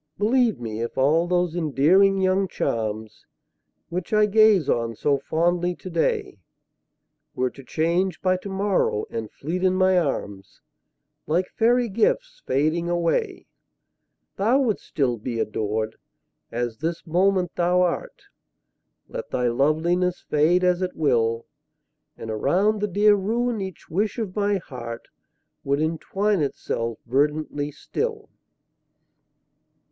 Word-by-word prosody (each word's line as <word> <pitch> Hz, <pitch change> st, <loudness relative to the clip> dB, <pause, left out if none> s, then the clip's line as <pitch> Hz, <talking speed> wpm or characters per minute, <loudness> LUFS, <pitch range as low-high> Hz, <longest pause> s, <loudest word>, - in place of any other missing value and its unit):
Believe 230 Hz, -, +2 dB
me, 110 Hz, -2 st, -5 dB
if 115 Hz, -, -4 dB
all 155 Hz, +6 st, +3 dB
those 175 Hz, -1 st, 0 dB
endearing 175 Hz, +5 st, +3 dB
young 190 Hz, +1 st, +2 dB
charms, 110 Hz, -, -3 dB, 0.6 s
Which 180 Hz, +3 st, -4 dB
I 215 Hz, 0 st, +5 dB
gaze 210 Hz, -5 st, +4 dB
on 115 Hz, -1 st, 0 dB
so 140 Hz, +5 st, +1 dB
fondly 175 Hz, +4 st, 0 dB
today, 170 Hz, -, -2 dB, 1.0 s
Were 130 Hz, 0 st, 0 dB
to 135 Hz, -, -13 dB
change 170 Hz, +5 st, 0 dB
by 185 Hz, -1 st, +1 dB
to 190 Hz, +2 st, -8 dB
morrow, 190 Hz, -, 0 dB
and 115 Hz, -2 st, -4 dB
fleet 175 Hz, +6 st, -4 dB
in 185 Hz, 0 st, +3 dB
my 185 Hz, -1 st, +4 dB
arms, 100 Hz, -, -4 dB, 0.7 s
Like 175 Hz, +4 st, 0 dB
fairy 240 Hz, +2 st, +2 dB
gifts -, -, 0 dB
fading 155 Hz, +5 st, +1 dB
away, 175 Hz, -, -1 dB, 0.9 s
Thou 235 Hz, +8 st, +3 dB
wouldst 230 Hz, -6 st, -1 dB
still 130 Hz, -6 st, 0 dB
be 115 Hz, +1 st, -4 dB
adored, 110 Hz, 0 st, -2 dB, 0.5 s
as 120 Hz, -1 st, -3 dB
this 165 Hz, +3 st, -3 dB
moment 185 Hz, +1 st, +2 dB
thou 180 Hz, +1 st, +3 dB
art. 175 Hz, -, -3 dB, 0.8 s
Let -, -, -7 dB
thy 125 Hz, -1 st, 0 dB
loveliness 165 Hz, +8 st, +1 dB
fade 165 Hz, +5 st, +3 dB
as 180 Hz, 0 st, +2 dB
it 185 Hz, -1 st, -2 dB
will. 115 Hz, -6 st, +1 dB, 0.7 s
And 110 Hz, -, -6 dB
around 200 Hz, -, +1 dB
the 210 Hz, -, +1 dB
dear 205 Hz, +2 st, +4 dB
ruin 225 Hz, +3 st, 0 dB
each 190 Hz, -3 st, -7 dB
wish 205 Hz, +8 st, -1 dB
of 215 Hz, -6 st, -4 dB
my 205 Hz, -1 st, +1 dB
heart 125 Hz, -8 st, -8 dB, 0.5 s
Would 140 Hz, +1 st, 0 dB
entwine 185 Hz, +5 st, 0 dB
itself 115 Hz, -5 st, -2 dB
verdantly 145 Hz, +3 st, 0 dB
still. 435 Hz, -, -4 dB
175 Hz, 125 wpm, -24 LUFS, 135-195 Hz, 1.0 s, I